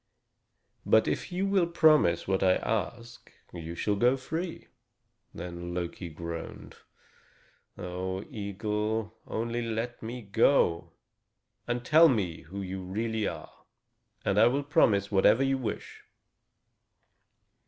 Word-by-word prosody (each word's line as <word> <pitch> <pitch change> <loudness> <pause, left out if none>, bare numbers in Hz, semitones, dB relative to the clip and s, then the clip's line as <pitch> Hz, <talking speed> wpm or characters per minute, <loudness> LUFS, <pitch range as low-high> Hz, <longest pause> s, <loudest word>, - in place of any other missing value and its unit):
But - - +4
if - - -2
you 185 +2 -1
will 195 -3 +2
promise 155 - +4
what 95 0 +1
I 95 -1 +4
ask, 115 +2 -4 0.2
you 85 -1 -6
shall 105 +4 0
go 125 +6 +3
free." 165 +6 -5 0.7
Then 85 0 -6
Loki 85 0 -4
groaned: 85 +1 -7 1.0
"O 95 +2 -4
eagle, 105 -1 -3
only 115 +1 -2
let 115 +1 -3
me 120 +2 -6
go, 100 -4 +2 0.7
and 120 0 -2
tell 160 +4 +7
me 95 - -1
who 100 +4 -7
you 95 0 -5
really 110 +3 -2
are, - - -8 0.6
and 100 +1 +2
I 115 - +7
will 140 +4 +1
promise 100 -8 +3
whatever 105 +5 +4
you 135 0 +1
wish." 120 - -5
110 Hz, 120 wpm, -29 LUFS, 95-125 Hz, 1.0 s, tell